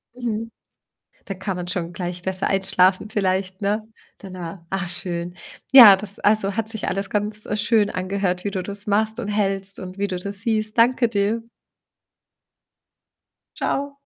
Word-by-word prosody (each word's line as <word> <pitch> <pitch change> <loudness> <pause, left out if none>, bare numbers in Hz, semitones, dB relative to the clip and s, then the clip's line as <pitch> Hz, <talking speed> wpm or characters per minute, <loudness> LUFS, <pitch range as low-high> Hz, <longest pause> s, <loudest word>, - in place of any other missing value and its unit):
.Mhm. 230 -2 -4 0.7
Da 195 - -4
kann 190 0 -4
man 175 0 -5
schon 175 -2 -3
gleich 175 0 -5
besser 190 0 0
einschlafen 190 +1 +2
vielleicht, 190 -1 -1
ne, 210 +2 -1 0.3
danach. 185 -2 -8
Ah, 195 -2 -2
schön. 175 0 -3 0.4
Ja, 225 -7 +11
das 200 0 -8
also, 205 -1 +2
hat 225 -1 -1
sich 220 -2 -4
alles 195 +1 -2
ganz, 210 +1 -1
äh, 210 - -2
schön 210 -1 +2
angehört, 185 0 -2
wie 200 - -1
du 185 -1 -3
das 200 +2 -4
machst 220 +3 +1
und 215 - -4
hältst 195 -1 -1
und 185 0 -8
wie 200 0 -1
du 185 - -4
das 200 +2 -6
siehst. 220 -1 0
Danke 235 0 +4
dir. 215 +2 0 2.1
Tschau. 280 0 -2
200 Hz, 155 wpm, -22 LUFS, 185-215 Hz, 2.1 s, Ja